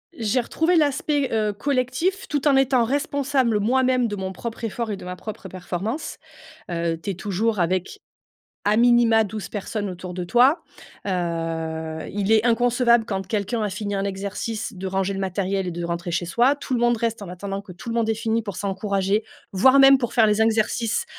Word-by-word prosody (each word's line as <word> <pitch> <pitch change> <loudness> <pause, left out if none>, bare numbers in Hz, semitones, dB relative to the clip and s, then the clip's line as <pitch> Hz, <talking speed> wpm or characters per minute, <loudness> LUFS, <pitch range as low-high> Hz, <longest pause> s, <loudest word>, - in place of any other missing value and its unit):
J'ai 225 +2 0
retrouvé 325 +8 +1
l'aspect, 290 -2 +1
heu, 215 -2 +1
collectif 280 - -1
tout 290 -1 0
en 280 - +5
étant 265 -2 +3
responsable 270 -2 0
moi-même 255 +2 +2
de 210 - -4
mon 190 -1 -4
propre 230 +5 -7
effort 225 0 -3
et 200 - -3
de - - -10
ma 180 0 -5
propre 215 +3 -8
performance, 185 - -4 0.5
heu, 170 -1 -1
tu 205 - -5
es - - -3
toujours 205 +3 -1
avec, 180 +1 -1 0.7
a 210 +1 +3
minima 235 -1 +5
12 210 0 -6
personnes 205 0 -4
autour 180 0 -7
de 180 - -4
toi. 245 - +4 0.4
Heu, 165 -3 -3
il 205 0 -1
est 220 0 +4
inconcevable 240 0 +3
quand 195 -3 -3
quelqu'un 215 +2 -1
a 210 - -1
fini 205 +1 -3
un 195 - -1
exercice 200 +4 -4
de 190 0 -6
ranger 190 +1 -1
le 195 - -4
matériel 190 0 -1
et - - -2
de 170 +1 -4
rentrer 170 +1 -3
chez 175 - -1
soi. 240 +9 +3
Tout 285 -2 -4
le 240 - 0
monde 240 0 +3
reste 230 0 -2
en 200 - -7
attendant 195 +2 -5
que 200 -2 -12
tout 180 +7 -11
le 230 - -2
monde 230 -1 +1
ait 225 - +2
fini 225 +1 -1
pour 200 -3 -6
s'encourager, 200 +1 -1 0.3
voire 260 +8 +5
même 270 0 +8
pour 240 -3 -3
faire 225 -2 +5
les 210 +1 +2
exercices 225 +1 +1
215 Hz, 200 wpm, -23 LUFS, 190-240 Hz, 0.7 s, même